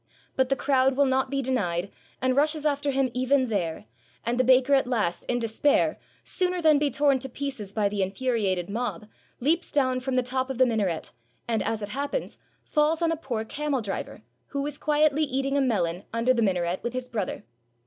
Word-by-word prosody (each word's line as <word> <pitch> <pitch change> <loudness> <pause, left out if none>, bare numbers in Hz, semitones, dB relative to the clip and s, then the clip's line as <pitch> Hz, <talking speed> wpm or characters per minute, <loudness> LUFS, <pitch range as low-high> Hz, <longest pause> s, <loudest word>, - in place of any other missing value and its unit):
But 260 -1 +2
the 270 - +3
crowd 270 -1 +2
will 280 - +5
not 265 0 +1
be 275 0 -1
denied, 200 -8 -1 0.3
and 255 0 +2
rushes 300 +2 +1
after 285 -1 +1
him 270 -2 +1
even 255 0 +2
there; 170 - -2 0.4
and 240 +1 0
the - - +5
baker 260 +2 +4
at 270 -2 +4
last, 215 -9 -1
in 245 - 0
despair, 235 +5 +1 0.2
sooner 365 -1 -1
than 310 -3 +5
be 295 0 +2
torn 280 -1 +2
to 265 +1 -6
pieces 260 -7 -5
by 205 0 +1
the 200 0 -2
infuriated 195 -3 0
mob, 210 -2 -3 0.3
leaps 325 +7 +1
down 255 -3 +2
from 260 0 -2
the 255 - +3
top 260 +1 -1
of 265 - -4
the 255 - +5
minaret, 205 -9 -1 0.4
and, 225 -2 0
as 220 -1 -2
it 205 - -4
happens, 285 - -3 0.2
fails 310 +2 +1
on 330 - +2
a - - +1
poor 245 -8 -4
camel 290 +2 -2
driver, 200 - -5 0.2
who 280 0 -3
was 290 0 -4
quietly 300 0 +2
eating 275 -1 -1
a 280 - +3
melon 190 -8 0
under 230 +3 +2
the 235 - 0
minaret 180 -3 0
with 240 - -3
his 255 0 -4
brother. 220 -6 -3
255 Hz, 200 wpm, -26 LUFS, 220-280 Hz, 0.4 s, will